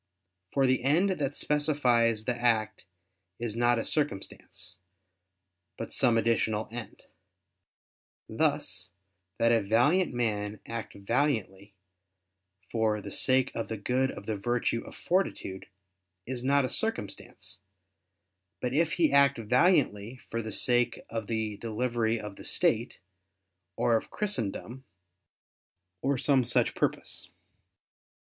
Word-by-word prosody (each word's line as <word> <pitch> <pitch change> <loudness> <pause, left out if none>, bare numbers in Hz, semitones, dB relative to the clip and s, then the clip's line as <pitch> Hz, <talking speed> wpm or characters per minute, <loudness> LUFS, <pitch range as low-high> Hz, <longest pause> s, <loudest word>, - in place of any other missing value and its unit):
For 135 -1 +2
the 130 -1 +2
end 165 +9 +3
that 145 -6 -2
specifies 125 -7 +2
the 125 - 0
act 110 -4 0 0.5
is 115 -2 -3
not 120 +1 +3
a 115 - -2
circumstance, 100 - -3 1.0
but 115 - -5
some 120 -4 +4
additional 110 -1 +1
end. 115 -3 -8 1.2
Thus, 110 - 0 0.5
that 115 0 +3
a 115 -1 +4
valiant 125 - +3
man 105 -4 -2
act 115 -2 -6
valiantly 100 -3 -1 1.0
for 110 -2 +1
the - - -8
sake 130 -1 +2
of 115 - -3
the 110 - -4
good 125 +6 +1
of 100 - -8
the 110 - -2
virtue 115 +2 -1
o[f] - - -10
fortitude, 175 - -1 0.6
is 125 -1 -4
not 140 +1 +3
a - - 0
circumstance; 220 - -4 1.0
but 125 0 -2
if 165 +3 +2
he 160 -5 +2
act 140 -1 +5
valiantly 125 - +2
for 115 -2 -5
the 110 -1 -6
sake 120 +1 +1
of 115 -2 -3
the 110 -2 -2
delivery 115 0 -1
of 105 -2 -8
the - - -10
state, - - +1 0.8
or 115 - +2
of 110 - -1
Christendom, 130 - -3 1.2
or 140 +1 +1
some 135 0 +3
such 120 0 +2
purpose. - - -2
120 Hz, 125 wpm, -29 LUFS, 110-135 Hz, 1.2 s, act